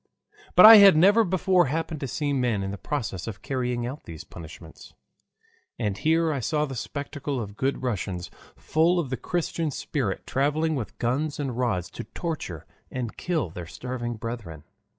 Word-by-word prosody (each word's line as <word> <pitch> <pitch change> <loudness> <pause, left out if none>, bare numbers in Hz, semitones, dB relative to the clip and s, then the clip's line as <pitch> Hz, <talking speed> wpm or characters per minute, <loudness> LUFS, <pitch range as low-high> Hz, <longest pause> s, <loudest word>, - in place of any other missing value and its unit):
But 180 - +10
I 220 0 +12
had 195 -5 +8
never 205 +7 +6
before 185 -2 +2
happened 160 +2 -3
to 135 - -3
see 145 +3 -2
men 120 -7 0
in 95 - -3
the 100 - -5
process 115 - -4
of 105 -4 -7
carrying 125 -2 -2
out 135 +5 -7
these 80 -2 -8
punishments. 80 0 -12 0.8
And 105 -5 -1
here 160 +3 +2
I 140 - -2
saw 150 +5 0
the 135 - -7
spectacle 140 +2 -4
of 100 -3 -6
good 130 +2 -1
Russians 95 -7 -3 0.2
full 165 +3 +2
of 150 -7 -2
the - - 0
Christian 170 -2 -2
spirit 130 -6 -3
traveling 150 +4 0
with 130 -7 -5
guns 140 +6 -1
and 135 -4 -2
rods 115 -9 -1
to - - -7
torture 155 - -5 0.2
and 125 -4 -4
kill 160 - -2
their 85 -1 -7
starving 120 +3 -5
brethren. 110 -9 -7
130 Hz, 170 wpm, -26 LUFS, 110-155 Hz, 0.8 s, I